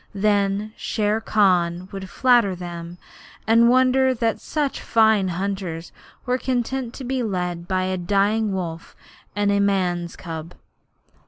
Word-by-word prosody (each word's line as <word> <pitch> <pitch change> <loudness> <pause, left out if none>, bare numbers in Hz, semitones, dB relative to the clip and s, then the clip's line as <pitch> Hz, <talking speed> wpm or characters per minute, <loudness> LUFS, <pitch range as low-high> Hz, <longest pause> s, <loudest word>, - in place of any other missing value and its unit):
Then 205 +1 +1
Shere 215 +1 -1
Khan 180 -5 +2
would 195 -1 -7
flatter 240 -7 +3
them 175 -1 -7 0.5
and 230 +2 +5
wonder 260 +1 +4
that 230 -1 -1
such 295 -3 -2
fine 220 -3 +3
young 175 -2 -3
hunters 185 -4 -4 0.3
were 250 0 0
content 255 -1 -2
to 270 - -7
be 260 +1 -2
led 180 -5 -3
by 185 -1 0
a 185 0 -1
dying 205 +4 +1
wolf 170 -4 -5 0.4
and 205 0 +1
a 200 - +2
man's 180 -4 0
cub. 165 0 -7
200 Hz, 140 wpm, -22 LUFS, 180-230 Hz, 0.5 s, and